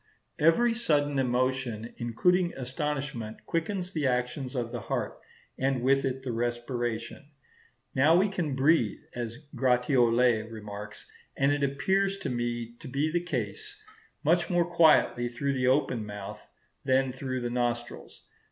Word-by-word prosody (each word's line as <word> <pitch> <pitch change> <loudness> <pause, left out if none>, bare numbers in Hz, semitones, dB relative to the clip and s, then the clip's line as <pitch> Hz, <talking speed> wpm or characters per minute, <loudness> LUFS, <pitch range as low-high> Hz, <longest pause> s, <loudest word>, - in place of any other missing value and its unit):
Every 195 +10 +4
sudden 145 - +1
emotion, 125 -2 -1
including 175 +10 +1
astonishment, 135 -4 -4
quickens 180 +2 -2
the 150 -4 0
action 125 +2 -1
of 120 -1 -2
the 120 - -3
heart, - - -3 0.4
and 130 -2 0
with 135 +1 +3
it 130 0 -2
the 130 - -3
respiration. 120 +2 -3 0.7
Now 145 +5 +5
we 195 +3 +4
can 175 -8 -2
breathe, 135 -5 +3 0.2
as 120 +4 -6
Gratiolet 125 -3 +3
remarks 105 -1 -8 0.3
and 140 +1 +3
as 145 - -1
appears 190 +9 +1
to 195 - -4
me 120 -1 -3
to - - -9
be 140 +4 0
the 175 +1 +1
case, 410 - -4 0.4
much 170 +3 +2
more 175 -2 +3
quietly 160 -8 +4
through 140 +3 -1
the 130 -1 0
open 130 -4 +2
mouth 105 -1 -8 0.3
than 130 0 +2
through 130 0 -4
the 120 0 -2
nostrils. 120 -1 -3
130 Hz, 140 wpm, -28 LUFS, 120-155 Hz, 0.7 s, Now